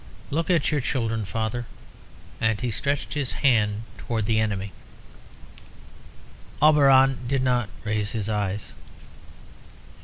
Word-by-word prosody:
Look 165 +5 -1
at 170 -5 +2
your 150 -2 +1
children, 115 -5 -1
father!" 115 +3 -3 0.7
and 110 -2 +1
he 125 -1 -2
stretched 140 +6 -2
his 140 -4 -2
hand 110 -5 +2
out - - -22
towards 110 -3 -1
the 110 0 +2
enemy. 100 -3 -1 1.9
Auberon 135 -3 +5
did 135 0 0
not 125 -4 +1
raise 105 -1 -1
his 105 -3 -2
eyes. 105 -2 -2
115 Hz, 120 wpm, -25 LUFS, 105-135 Hz, 1.9 s, Auberon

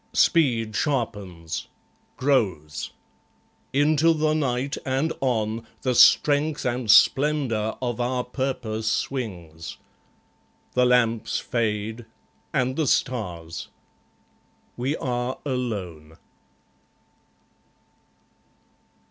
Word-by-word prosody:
Speed 120 - +3
sharpens; 100 - -2 0.5
grows. 100 - 0 0.8
Into 155 +3 +4
the 155 -1 +1
night, 135 -2 -1
and 135 +4 0
on, 115 -3 -1 0.2
The 130 -2 +1
strength 145 +4 +4
and 120 -2 -1
splendour 125 -2 +4
of 120 -1 -2
our 125 +1 0
purpose 125 -4 -2
swings. 90 - -4 1.0
The 125 0 +3
lamps 115 -2 +2
fade; 110 0 -2 0.4
and 130 -3 0
the 155 -3 +1
stars. 90 -12 -1 1.1
We 130 +5 -1
are 125 0 -2
alone. 95 - -4
125 Hz, 80 wpm, -25 LUFS, 110-135 Hz, 1.1 s, Into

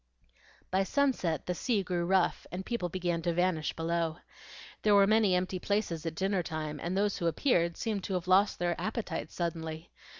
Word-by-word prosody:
By 190 +1 +3
sunset 195 - 0
the 180 - -1
sea 210 +2 0
grew 175 -2 -1
rough 190 -1 +2
and 185 +1 -5
people 235 -7 -2
began 175 -1 -1
to 170 0 -1
vanish 175 -3 +1
below. 165 0 -1 0.6
There 210 -1 +4
were 200 -1 +7
many 215 -2 +4
empty 185 +1 -1
places 175 -5 -1
at 160 - -3
dinner 190 +1 +1
time, 155 -3 -4
and 180 +3 -2
those 205 0 +1
who 170 - 0
appeared 170 - +1
seemed 215 -4 -2
to 190 - -2
have 180 -1 -2
lost 195 +3 +4
their 175 0 0
appetites 225 +1 -3
suddenly. 160 -2 -4
180 Hz, 180 wpm, -31 LUFS, 170-200 Hz, 0.6 s, were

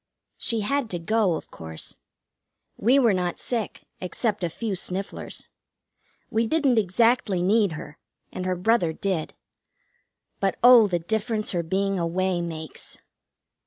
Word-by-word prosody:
She 230 -2 +1
had 275 +2 0
to 175 - -2
go, 195 +1 +1
of - - -8
course. 80 -1 -8 0.8
We 245 +6 +3
were 235 -6 +4
not 180 -2 -1
sick, 230 -5 -4 0.2
except 200 +2 -2
a 175 - +1
few 215 +5 -3
snifflers. 190 +2 -4 0.8
We 225 +1 +1
didn't 275 -5 +3
exactly 210 -1 +2
need 200 -1 +3
her, 150 -1 -9 0.3
and 185 0 -4
her 185 - +1
brother 180 -3 +2
did; 185 -3 -2 1.0
but 195 -1 +1
oh 245 -3 +9
the 180 -3 0
difference 215 +5 -2
her 175 - 0
being 195 +3 0
away 175 +1 0
makes! 160 -2 -7
195 Hz, 135 wpm, -25 LUFS, 175-225 Hz, 1.0 s, oh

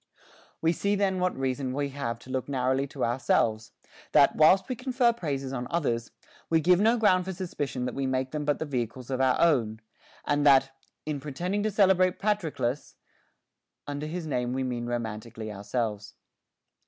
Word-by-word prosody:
We 165 - +4
see 200 +3 0
then 195 -2 +1
what 180 0 0
reason 130 0 -2
we 140 +1 -1
have 130 -4 -4
to 130 - -11
look 130 +1 -3
narrowly 130 0 0
to 135 -1 -2
ourselves, 115 -2 0 0.4
that, - - +5
whilst 185 +5 +5
we 255 - -2
confer 250 -1 +1
praises 140 - -4
on 125 -1 -3
others, 120 -9 -1 0.4
we 165 - +4
give 175 +3 +4
no 225 +4 +4
ground 185 -5 +3
for 190 - -4
suspicion 145 -8 -4
that 125 - -3
we 135 -1 -2
make 130 0 -1
them 150 -1 -3
but 145 0 +1
the - - -3
vehicles 125 -2 -4
of 130 0 0
our 130 -1 +3
own, 120 -10 +2 0.5
and 145 0 +1
that, 135 -2 +5 0.2
" - - -56
in 150 -2 -3
pretending 175 +8 -3
to 215 - 0
celebrate 190 -3 +3
Patroclus," 160 - -2 0.9
under 145 +1 -4
his 170 +1 -4
name 125 -4 -1
we 130 0 -1
mean 120 -2 -3
romantically 110 -1 -5
ourselves. 105 0 -3
140 Hz, 180 wpm, -27 LUFS, 125-180 Hz, 0.9 s, that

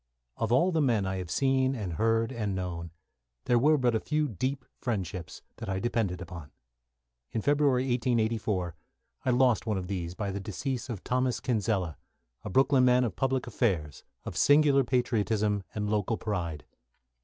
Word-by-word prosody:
Of 115 0 -1
all 170 +10 +4
the 160 -2 +1
men 115 -8 +2
I 95 0 -2
have 90 -2 -5
seen 135 +1 +2
and 100 -8 -4
heard 115 +6 +1
and 105 -6 -2
known, 85 -2 -4 0.6
there 120 -1 +4
were 150 +5 +4
but 125 -3 +2
a 110 - +2
few 150 +3 0
deep 130 +4 -3
friendships 95 - -4
that - - -6
I 95 - -1
depended 105 -4 -1
upon. 85 -5 -8 0.8
In 110 - -2
February, 145 -3 +3
1884, 115 -7 0 0.5
I - - +2
lost 125 -2 +3
one 105 -3 +1
of 95 - -3
these 90 -2 -4
by 100 0 -3
the 100 - -3
decease 120 +6 -4
of 110 -6 -5
Thomas 125 0 0
Kinsella, 100 - -1 0.4
a - - -5
Brooklyn 135 +4 +4
man 125 0 +5
of 110 -7 -2
public 135 -1 0
affairs, 85 - -1 0.2
of - - -6
singular 145 - +5
patriotism 110 -4 +1
and 105 -1 -1
local 105 +1 0
pride. 85 -8 -3
115 Hz, 165 wpm, -29 LUFS, 95-130 Hz, 0.8 s, man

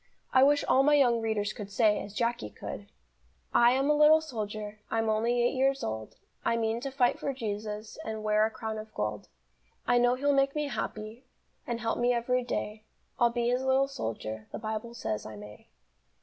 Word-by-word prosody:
I 260 - +6
wish 285 +2 +5
all 265 - +4
my 295 +2 +5
young 245 -5 +4
readers 215 -2 -1
could 205 -4 -7
say, 210 0 +3
as 200 0 -9
Jacky 235 - -1
could: - - -8 0.7
"I 240 +1 +6
am 270 +2 +1
a 300 - +4
little 300 +1 +6
soldier, 215 -7 -5
I'm 225 0 0
only 235 +3 +2
eight 240 - +2
years 270 +1 +1
old, 110 0 -4 0.3
I 230 - +1
mean 225 0 0
to 275 - -3
fight 260 -2 +1
for 275 - -2
Jesus 210 -2 -5
And 220 -1 -5
wear 215 0 +3
a 220 - +2
crown 220 -1 -5
of 215 0 -9
gold. 105 -1 -3 0.6
I 245 0 +4
know 245 +1 +4
He'll 285 +2 +1
make 275 +1 +2
me 300 -1 -1
happy, 215 0 -5 0.4
And 235 -1 -3
help 225 0 -1
me 245 +1 +3
every 250 +1 0
day, 215 -3 -4 0.4
I'll 240 - +5
be 235 0 0
His 250 +1 +1
little 265 +1 +3
soldier, 110 - -5
The - - -5
Bible 220 +1 -5
says 110 - -3
I 110 - -8
may." 105 0 -12
230 Hz, 200 wpm, -29 LUFS, 215-260 Hz, 0.7 s, I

